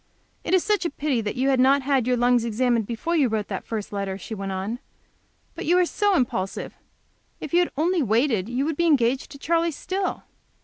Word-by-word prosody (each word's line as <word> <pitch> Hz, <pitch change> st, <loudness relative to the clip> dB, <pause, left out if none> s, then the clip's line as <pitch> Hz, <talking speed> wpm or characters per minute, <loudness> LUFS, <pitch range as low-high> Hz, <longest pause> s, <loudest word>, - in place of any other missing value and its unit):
"It -, -, +2 dB
is 370 Hz, -, +2 dB
such 420 Hz, -2 st, +1 dB
a 340 Hz, -, 0 dB
pity 280 Hz, -4 st, -1 dB, 0.2 s
you 265 Hz, +1 st, +2 dB
had 265 Hz, -2 st, +2 dB
not 270 Hz, +2 st, +4 dB
had 265 Hz, -3 st, +1 dB
your 250 Hz, -1 st, +2 dB
lungs 245 Hz, 0 st, +3 dB
examined 235 Hz, -1 st, 0 dB
before 245 Hz, +9 st, -2 dB
you 290 Hz, -5 st, +3 dB
wrote 215 Hz, -2 st, -2 dB
that 195 Hz, -, -5 dB
first 215 Hz, -2 st, -4 dB
letter," 200 Hz, -1 st, -3 dB
she 210 Hz, -, -8 dB
went 195 Hz, -2 st, -4 dB
on. 195 Hz, +6 st, -3 dB, 0.7 s
"But -, -, -7 dB
you 350 Hz, +2 st, +4 dB
are 360 Hz, -, +4 dB
so 410 Hz, +2 st, +1 dB
impulsive! 235 Hz, -, -2 dB, 0.7 s
If 310 Hz, -, -7 dB
you 345 Hz, -, +5 dB
had 355 Hz, -, +1 dB
only 340 Hz, +3 st, +2 dB
waited 225 Hz, -3 st, +1 dB
you 255 Hz, +3 st, -1 dB
would 315 Hz, -1 st, -2 dB
be 340 Hz, -, +2 dB
engaged 260 Hz, -4 st, +2 dB
to 280 Hz, -, -10 dB
Charley 335 Hz, +3 st, +1 dB
still!" 375 Hz, +5 st, -3 dB
260 Hz, 215 wpm, -24 LUFS, 225-325 Hz, 0.7 s, you